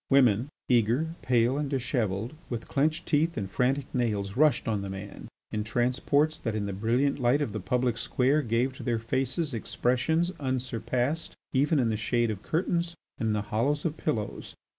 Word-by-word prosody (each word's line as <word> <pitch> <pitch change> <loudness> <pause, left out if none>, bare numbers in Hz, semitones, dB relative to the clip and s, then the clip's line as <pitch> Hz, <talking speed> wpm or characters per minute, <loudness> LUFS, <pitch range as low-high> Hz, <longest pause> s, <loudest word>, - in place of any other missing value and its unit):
Women, 125 -2 +4 0.2
eager, 125 +7 +2
pale, 125 +2 +2
and 145 -2 -2
dishevelled, 120 -4 -1 0.2
with 120 -2 -4
clenched 155 +3 +1
teeth 160 +2 +1
and 100 -3 -2
frantic 130 +7 +1
nails, 105 -5 -1
rushed 145 -2 +3
on 105 -3 0
the 100 - -5
man, 95 +1 -7 0.2
in 105 0 -1
transports 125 +7 +1
that, 115 - -2
in 105 -1 -1
the 100 - -3
brilliant 120 +8 +1
light 125 +3 +3
of 145 -7 -1
the 110 - -2
public 120 +4 0
square, 135 +6 +2
gave 120 +1 0
to - - -8
their 120 -2 0
faces 135 +6 -1
expressions 130 - +1
unsurpassed 130 +2 -1 0.2
even 145 +4 +3
in 125 -4 +2
the 110 - 0
shade 115 +1 +1
of 100 -2 -5
curtains 170 - -1 0.2
and 115 - 0
in 110 - +2
the 105 -1 0
hollows 145 +8 +1
of 160 -2 0
pillows. 110 -12 -3
125 Hz, 180 wpm, -28 LUFS, 110-145 Hz, 0.2 s, Women